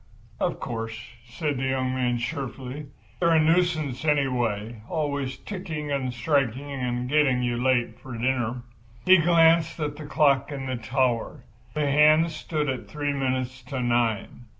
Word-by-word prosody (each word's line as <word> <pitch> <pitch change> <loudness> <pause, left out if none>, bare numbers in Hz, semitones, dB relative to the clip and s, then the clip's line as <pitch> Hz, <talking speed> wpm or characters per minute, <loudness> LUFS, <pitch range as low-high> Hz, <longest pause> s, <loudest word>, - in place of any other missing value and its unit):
"Of - - -1
course," 115 -1 -4 0.3
said 145 +4 -3
the 130 +1 -1
young 130 -1 0
man, 125 -2 0
cheerfully, 135 +3 -5 0.3
"they're 170 -2 +3
a - - +6
nuisance, 155 -5 +1
anyway—always 130 - -1
ticking 160 -7 -5
and 135 -3 -1
striking 135 +1 0
and 125 -2 -2
getting 135 -3 +3
you 120 -1 -1
late 120 -3 +1
for 130 - -9
dinner." 120 0 -1 0.4
He 185 0 +8
glanced 165 -1 +4
again 150 -2 -2
at 145 - -15
the 155 - -8
clock 140 -2 +2
in 135 -2 -5
the 130 -1 -2
tower. 120 0 -1 0.3
The 150 -1 +1
hands 155 +3 +4
stood 155 -1 -2
at 130 -3 -3
three 145 -1 -2
minutes 130 -1 -2
to 135 -2 -4
nine. 120 -1 0
135 Hz, 150 wpm, -26 LUFS, 125-150 Hz, 0.4 s, He